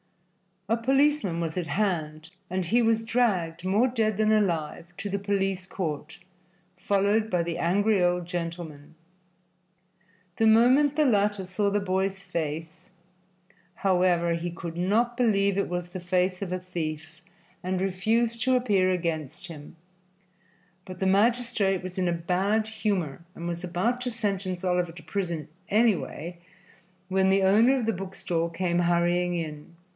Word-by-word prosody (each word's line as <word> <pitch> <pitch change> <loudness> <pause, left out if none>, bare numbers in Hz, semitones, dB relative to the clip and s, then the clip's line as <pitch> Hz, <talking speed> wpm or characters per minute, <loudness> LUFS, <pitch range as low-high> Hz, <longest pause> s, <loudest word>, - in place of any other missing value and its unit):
A 230 +3 +2
policeman 265 - +2
was 165 +1 -3
at 175 -3 -2
hand 160 -3 -2 0.2
and 185 0 -1
he 235 +8 +3
was 225 -1 +2
dragged, 190 -8 0
more 205 +7 +3
dead 220 -4 0
than 215 0 +3
alive, 170 -7 0
to 205 - -4
the 200 +1 -2
police 195 -2 -1
court, 155 -6 -4 0.6
followed 205 +3 +1
by 180 -3 +1
the 170 0 -3
angry 200 +4 +2
old 175 0 +1
gentleman. 165 -4 -6 1.4
The 225 - +3
moment 255 +6 +5
the 305 0 +3
latter 205 -5 +2
saw 195 +3 0
the 205 +1 0
boy's 190 0 -1
face, 165 -1 -5 0.9
however, 180 -3 +2
he 170 +1 -2
could 170 -1 -7
not 225 +7 +1
believe 200 -5 +2
it 200 - +1
was 175 0 -3
the 185 - -6
face 180 +1 0
of 190 -3 -4
a - - 0
thief, 160 -3 -6 0.4
and 185 0 -2
refused 225 +5 0
to 260 +1 +3
appear 205 -7 +2
against 170 -3 -3
him, 155 -1 -11 1.1
but 185 -1 -9
the 190 - 0
magistrate 200 -2 +2
was 185 0 -5
in 180 - +1
a 175 - +1
bad 190 +6 0
humor 200 -9 -2
and 170 - -6
was 170 +1 -4
about 190 +8 -1
to 250 - -2
sentence 195 -5 -3
Oliver 180 -2 0
to 165 -1 -12
prison, 170 -2 -3 0.2
anyway, 190 -6 0 0.7
when 190 0 +2
the 195 0 +3
owner 220 +7 +5
of 245 - -1
the 225 - +1
book 195 +1 -7
stall 170 -1 -1
came 175 +1 -1
hurrying 175 +1 +2
in. 155 -1 -6
185 Hz, 150 wpm, -27 LUFS, 170-210 Hz, 1.4 s, moment